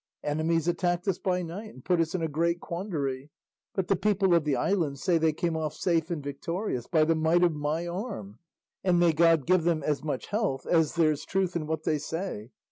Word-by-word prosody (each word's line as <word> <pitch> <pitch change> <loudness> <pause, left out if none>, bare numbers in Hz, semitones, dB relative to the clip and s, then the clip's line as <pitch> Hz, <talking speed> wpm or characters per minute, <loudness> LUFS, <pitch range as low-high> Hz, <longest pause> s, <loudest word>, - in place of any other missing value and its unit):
Enemies 160 +2 0
attacked 175 +1 0
us 190 -2 0
by 180 -2 0
night 190 +6 -6
and 130 - -15
put 180 -2 +3
us 160 +2 -1
in 175 - -1
a - - +1
great 170 +3 0
quandary, 150 -8 -4 0.5
but 190 -2 -1
the 195 - +3
people 195 -1 +2
of 170 -3 +3
the 145 -3 +1
island 165 -8 0
say 170 +3 +2
they 160 0 +3
came 165 +2 -2
off 155 -2 -2
safe 165 -2 0
and 165 -5 -3
victorious 145 - -3
by 160 -3 +3
the 165 +1 +3
might 160 +2 +3
of 175 -2 +4
my 150 +3 -2
arm; 170 - -5 0.4
and 180 -2 +3
may 170 -2 +4
God 165 -3 +4
give 185 -1 +3
them 165 -2 +1
as 150 -2 -1
much 145 -4 -3
health 205 - -1
as 160 -2 +2
there's 155 -3 +2
truth 190 -2 -1
in 155 -3 -2
what 160 0 -2
they 155 -2 +1
say. 155 - -5
165 Hz, 215 wpm, -28 LUFS, 155-180 Hz, 0.5 s, of